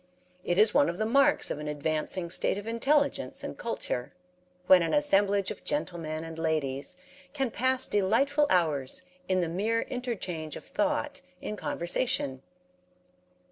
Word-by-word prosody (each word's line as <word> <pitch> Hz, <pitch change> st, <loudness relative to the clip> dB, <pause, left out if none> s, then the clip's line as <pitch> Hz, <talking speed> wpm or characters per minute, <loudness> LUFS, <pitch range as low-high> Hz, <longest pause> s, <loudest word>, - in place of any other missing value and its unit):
It 175 Hz, -, 0 dB
is 215 Hz, +1 st, +5 dB
one 285 Hz, -, +4 dB
of 170 Hz, -, -4 dB
the 215 Hz, -, 0 dB
marks 275 Hz, +5 st, +3 dB
of -, -, -3 dB
an 150 Hz, -, -5 dB
advancing 155 Hz, +4 st, -2 dB
state -, -, +2 dB
of 205 Hz, -, -6 dB
intelligence 280 Hz, +6 st, +1 dB
and -, -, -5 dB
culture, 125 Hz, -, -4 dB, 0.5 s
when 185 Hz, -1 st, +7 dB
an 165 Hz, -, +1 dB
assemblage 200 Hz, -9 st, +3 dB
of -, -, -8 dB
gentlemen 165 Hz, -, -3 dB
and 165 Hz, 0 st, -8 dB
ladies 155 Hz, -1 st, -1 dB, 0.4 s
can 270 Hz, -4 st, -1 dB
pass 260 Hz, +2 st, +2 dB
delightful 270 Hz, +9 st, +2 dB
hours 155 Hz, -3 st, +1 dB, 0.3 s
in 185 Hz, -1 st, +2 dB
the 170 Hz, -, 0 dB
mere 210 Hz, +7 st, 0 dB
interchange 195 Hz, -, -4 dB
of -, -, -9 dB
thought 295 Hz, -1 st, -1 dB, 0.2 s
in 210 Hz, -, -5 dB
conversation. 170 Hz, -, -1 dB
195 Hz, 145 wpm, -28 LUFS, 160-255 Hz, 0.5 s, when